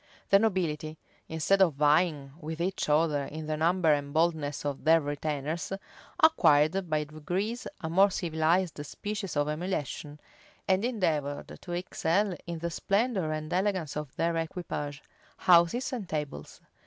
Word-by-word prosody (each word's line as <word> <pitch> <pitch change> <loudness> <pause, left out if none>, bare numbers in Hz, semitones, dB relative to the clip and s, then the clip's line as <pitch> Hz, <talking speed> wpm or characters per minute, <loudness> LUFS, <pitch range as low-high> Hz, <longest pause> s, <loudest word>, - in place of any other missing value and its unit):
The 195 - +8
nobility, 160 -7 -1 0.3
instead 160 +5 +2
of 170 -7 +4
vying 150 -1 +2
with 160 +1 -6
each 180 -2 -1
other 150 -2 +2
in 155 +2 -7
the 155 0 -1
number 165 0 +3
and 140 -1 -2
boldness 155 -3 0
of 140 -2 -3
their 165 +2 +6
retainers, 150 +2 -3 0.5
acquired 175 - +4
by 155 -1 +1
degrees 175 +10 -3
a 160 - -3
more 190 +5 +5
civilized 165 -2 0
species 200 +1 -5
of 145 0 +2
emulation, 150 -2 -3 0.5
and 190 +2 +2
endeavored 160 - -1
to 175 - -6
excel 180 +2 0
in 170 -1 -4
the 170 +1 -3
splendor 195 -2 0
and 155 +2 -4
elegance 185 -5 0
of 150 -3 -5
their 170 0 0
equipage, 155 -3 -4 0.3
houses, 180 +10 +4
and 215 -8 -4
tables. 145 - -5
160 Hz, 140 wpm, -29 LUFS, 150-185 Hz, 0.5 s, The